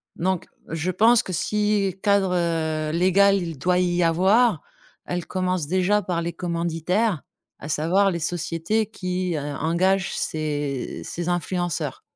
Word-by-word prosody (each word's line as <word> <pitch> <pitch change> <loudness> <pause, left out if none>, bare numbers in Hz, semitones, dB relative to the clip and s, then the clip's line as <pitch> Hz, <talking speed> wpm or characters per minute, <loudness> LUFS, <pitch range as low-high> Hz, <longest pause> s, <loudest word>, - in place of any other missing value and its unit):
Donc 185 0 -1 0.2
je 165 +3 -2
pense 225 +5 +4
que 185 - -6
si 205 +1 0
cadre, 200 -2 +3
heu, 160 -3 0
légal, 190 +4 +4
il 170 -5 -4
doit 180 +6 +1
y 175 -1 +1
avoir, 190 +3 +3 0.4
elle 175 -2 -3
commence 185 -4 -1
déjà 185 +4 +2
par 175 -3 -2
les 170 0 -3
commanditaires, 170 +2 -1 0.4
à 150 - -8
savoir 180 +7 +2
les 170 - -3
sociétés 175 +5 -1
qui, 185 -4 -2
heu, - - -1
engagent 170 +6 0
ces 145 -4 -3
ces 175 +1 -4
influenceurs. 175 -1 -2
175 Hz, 140 wpm, -24 LUFS, 165-190 Hz, 0.4 s, pense